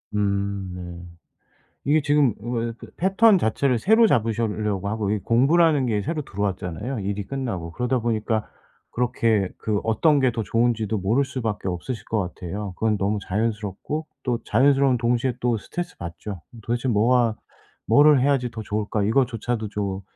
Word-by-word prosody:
음 100 -2 -1
네. 90 -1 -8 0.8
이게 150 +2 +3
지금 145 -5 +3
왜 115 0 -2
그 - - -11
패턴 195 +3 +5
자체를 125 -1 +1
새로 220 - +5
잡으시려고 110 - 0
하고 110 -2 -2
이게 105 -2 -1
공부라는 145 +4 +4
게 105 -4 0
새로 155 +8 -2
들어왔잖아요, 100 - -3
일이 100 +1 -3
끝나고. 115 -12 -4
그러다 125 +5 0
보니까 110 -1 -1 0.4
그렇게 115 -5 +1
그 105 -2 -1
어떤 140 +7 +3
게 130 -2 +3
더 115 -1 -3
좋은지도 110 0 0
모를 115 +9 +2
수밖에 115 -7 -3
없으실 95 +7 -4
것 110 - -1
같아요. 95 +2 -5
그건 110 -1 +1
너무 100 +2 0
자연스럽고 110 +8 -2 0.2
또 120 -3 0
자연스러운 135 +2 +3
동시에 120 +1 +1
또 120 -2 +1
스트레스 175 +11 -6
받죠. 85 +2 -7 0.2
도대체 120 +4 -2
뭐가 115 +1 +3 0.5
'뭐를 145 -2 +6
해야지 135 -3 +2
더 110 - -6
좋을까?' 105 0 -2
이거조차도 115 -1 0
좀, 100 -2 -3
115 Hz, 350 characters per minute, -24 LUFS, 100-130 Hz, 0.8 s, 뭐를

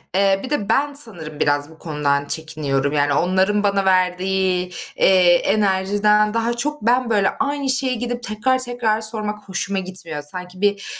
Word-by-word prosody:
Eee, 195 0 +3
bir 260 - -6
de 280 -9 -2
ben 285 +1 +1
sanırım 175 - -2
biraz 145 0 0
bu 160 0 -17
konudan 145 -3 -1
çekiniyorum. 145 -2 -2
Yani 145 -1 +1
onların 190 +6 +1
bana 200 -1 +1
verdiği, 185 0 +1 0.3
eee, 185 -2 +5
enerjiden 205 +2 +2
daha 230 +1 0
çok 295 +5 -2
ben, 245 +2 +1
böyle, 205 -3 +2
aynı 280 -1 -1
şeye 260 0 +1
gidip 245 +1 -4
tekrar 245 +3 0
tekrar 240 -3 +1
sormak 210 -2 -3
hoşuma 195 +1 -1
gitmiyor. 185 -5 -3
Sanki 180 +5 -4
bir, 205 -1 0
195 Hz, 160 wpm, -20 LUFS, 180-230 Hz, 0.3 s, eee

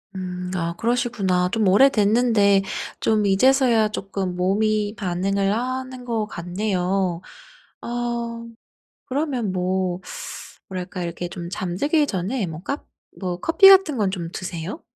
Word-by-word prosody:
음 180 -1 -5
아 170 -1 -2
그러시구나. 215 -7 0
좀 220 -3 +1
오래됐는데 210 -2 +4 0.4
좀 215 -2 +2
이제서야 235 +2 +4
쪼끔 195 -3 -4
몸이 210 +3 +1
반응을 195 +1 0
하는 255 +2 -3
것 225 -3 -1
같네요. 180 -1 -1 0.6
어 - - -7 1.2
그러면 260 -7 -1
뭐 185 0 -1 0.7
뭐랄까 185 -1 -5
이렇게 175 +1 -4
좀 175 -1 -7
잠들기 215 - 0
전에 195 +4 -2
뭐 160 +1 -7
까 280 +2 -4 0.4
뭐 180 -2 -3
커피 385 +4 +6
같은 380 -8 +7
건 200 -3 +1
좀 175 -3 -4
드세요? 180 -1 -5
195 Hz, 240 characters per minute, -23 LUFS, 180-235 Hz, 1.2 s, 같은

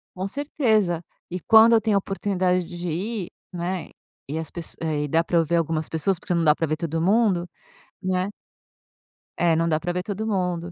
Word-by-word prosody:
Com 185 +1 -3
certeza. 220 - +1 0.3
E 180 - -4
quando 225 +5 +7
eu 225 - +5
tenho 215 -1 +1
a - - +5
oportunidade 185 -2 0
de 175 0 -5
ir, 190 +4 -3 0.2
né, 175 -1 -3 0.4
e 150 +4 -3
as 160 -2 -5
pesso 170 -2 -6
eh, 155 -2 -1
e 150 - -2
dá 165 +3 +2
para 170 - 0
eu 165 - +3
ver 170 +2 0
algumas 160 -1 0
pessoas, 165 +3 0
porque 180 - -3
não 170 -1 +1
dá 150 - +6
pra 165 - -1
ver 155 - 0
todo 165 -1 -2
mundo, 190 -2 +2 0.5
né. 185 0 0 1.1
É, 170 -2 +3
não 165 +1 +1
dá 155 -1 +1
pra 175 +1 -2
ver 180 - -2
todo 210 +3 -4
mundo. 180 -4 -1
175 Hz, 205 wpm, -24 LUFS, 165-195 Hz, 1.1 s, quando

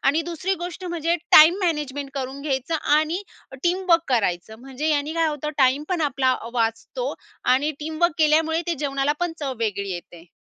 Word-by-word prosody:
आणि 285 +4 +3
दुसरी 345 +3 -2
गोष्ट 355 +1 -6
म्हणजे 340 -1 -1 0.2
टाईम 315 +3 +9
मॅनेजमेंट 290 -4 -2
करून 270 0 -4
घ्यायचं 280 +2 -2 0.2
आणि 325 +6 -1 0.4
टीमवर्क 350 -1 +2
करायचं, 220 -3 0
म्हणजे 270 +4 -4
यांनी 295 +1 0
काय 330 -1 +2
होतं, 300 0 -3
टाईम 270 +3 +3
पण 360 -3 -1
आपला 270 -3 +1
अ, 230 - -7
वाचतो 230 - -1 0.4
आणि 290 +4 +1
टीमवर्क 315 +2 0
केल्यामुळे 320 +2 +3
ते 340 - 0
जेवणाला 275 0 0
पण 350 -2 0
चव 275 -3 -2
वेगळी 200 -3 -2
येते. 175 -1 -9
300 Hz, 165 wpm, -23 LUFS, 265-330 Hz, 0.4 s, टाईम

